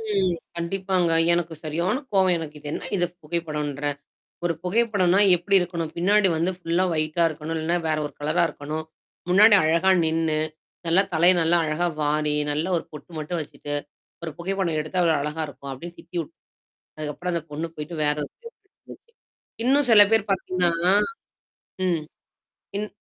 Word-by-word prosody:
ம். 190 Hz, -2 st, +2 dB, 0.2 s
கண்டிப்பாங்க. 180 Hz, 0 st, 0 dB, 0.2 s
எனக்கு 170 Hz, -1 st, -1 dB
சரியானா 170 Hz, -, -1 dB
கோவம் 190 Hz, -2 st, +4 dB
எனக்கு 155 Hz, -2 st, -7 dB
இது 145 Hz, -, -10 dB
என்ன 175 Hz, -, -5 dB
இது 175 Hz, -, +2 dB, 0.2 s
புகைப்படோன்ற, 150 Hz, -3 st, -3 dB, 0.6 s
ஒரு 170 Hz, -1 st, +1 dB
புகைப்படம்னா 200 Hz, -2 st, +2 dB, 0.2 s
எப்படி 195 Hz, +3 st, +1 dB
இருக்கணும். 170 Hz, -2 st, -3 dB
பின்னாடி 200 Hz, +3 st, +3 dB
வந்து 170 Hz, +3 st, +1 dB
ஃபுல்லா 175 Hz, +1 st, 0 dB
ஒயிட்டா 155 Hz, +2 st, +1 dB
இருக்கணும், 155 Hz, +1 st, -6 dB
இல்லைனா 170 Hz, +2 st, 0 dB
வேற 155 Hz, -, +1 dB
ஒரு -, -, -11 dB
கலரா 155 Hz, +4 st, +1 dB
இருக்கணும். 150 Hz, +1 st, -5 dB, 0.5 s
முன்னாடி 205 Hz, +4 st, +7 dB
அழகா 170 Hz, +4 st, +3 dB
நின்னு. 160 Hz, -1 st, 0 dB, 0.5 s
நல்லா 170 Hz, +4 st, +4 dB
தலைய 170 Hz, +3 st, +6 dB
நல்லா 170 Hz, +2 st, +3 dB
அழகா 155 Hz, +3 st, 0 dB, 0.2 s
வாரி, 150 Hz, 0 st, +1 dB, 0.2 s
நல்லா 155 Hz, +4 st, -1 dB
ஒரு -, -, -8 dB
பொட்டு 150 Hz, +3 st, -11 dB
மட்டும் 160 Hz, +3 st, -3 dB
வச்சுட்டு. 145 Hz, -1 st, -6 dB, 0.5 s
ஒரு 165 Hz, -, -4 dB
புகைப்படம் 175 Hz, -2 st, -1 dB
எடுத்து 155 Hz, +4 st, -4 dB
எவ்வள 170 Hz, -2 st, +3 dB
அழகா 150 Hz, +2 st, -3 dB
இருக்கும். 140 Hz, -1 st, -9 dB
அப்டின்னு 170 Hz, +6 st, -9 dB
திட்டி 175 Hz, +1 st, -12 dB
விட் 160 Hz, -, -8 dB, 0.6 s
அதுக்கப்புறம் 155 Hz, +4 st, -4 dB
அந்த 170 Hz, -, -1 dB
பொண்ணு 155 Hz, +3 st, -3 dB
போய்ட்டு 150 Hz, +3 st, -6 dB
வேற 150 Hz, 0 st, +2 dB
ஒரு -, -, -7 dB
புகைப்படம் 465 Hz, -3 st, -16 dB
எடுத்து -, -, -32 dB
வந்துச்சு. 465 Hz, -, -16 dB, 0.5 s
இன்னும் 275 Hz, +2 st, +3 dB
சில 215 Hz, -2 st, +9 dB
பேர் 220 Hz, -2 st, +2 dB
பாத்தீங்கன்னா. 180 Hz, -1 st, +2 dB, 0.9 s
ம், 170 Hz, -4 st, 0 dB, 0.7 s
இன் 210 Hz, +1 st, -2 dB
170 Hz, 160 wpm, -24 LUFS, 155-185 Hz, 0.9 s, சில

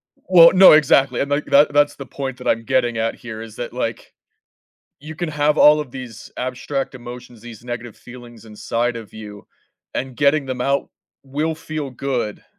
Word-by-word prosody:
Well, 170 Hz, -2 st, +6 dB
no 190 Hz, 0 st, +8 dB
exactly, 140 Hz, -4 st, +3 dB
and, 140 Hz, -, -2 dB
like, 145 Hz, +1 st, -1 dB
that 145 Hz, +1 st, +4 dB
that's 145 Hz, 0 st, +3 dB
the 140 Hz, -, -9 dB
point 130 Hz, 0 st, -6 dB
that 125 Hz, -, -8 dB
I'm 115 Hz, -, +1 dB
getting 120 Hz, -2 st, 0 dB
at 115 Hz, 0 st, -1 dB
here 110 Hz, -2 st, -9 dB
is 110 Hz, -1 st, -10 dB
that, 120 Hz, -, -6 dB
like, 115 Hz, -3 st, -5 dB, 0.9 s
you 155 Hz, +2 st, -9 dB
can 175 Hz, +1 st, -4 dB
have 150 Hz, 0 st, 0 dB
all 150 Hz, +1 st, +6 dB
of 150 Hz, -4 st, -7 dB
these 125 Hz, -3 st, -10 dB
abstract 130 Hz, +2 st, -4 dB
emotions, 120 Hz, -1 st, -11 dB
these 120 Hz, -1 st, -12 dB
negative 120 Hz, -2 st, -7 dB
feelings 120 Hz, -2 st, -13 dB
inside 115 Hz, +2 st, -3 dB
of 115 Hz, -3 st, -10 dB
you, 105 Hz, -2 st, -11 dB, 0.5 s
and 130 Hz, -1 st, -4 dB
getting 145 Hz, 0 st, +2 dB
them 130 Hz, -1 st, -5 dB
out 140 Hz, +2 st, -1 dB, 0.3 s
will 150 Hz, +4 st, -3 dB
feel 155 Hz, -3 st, -6 dB
good, 125 Hz, -5 st, -4 dB
130 Hz, 180 wpm, -20 LUFS, 120-145 Hz, 0.9 s, no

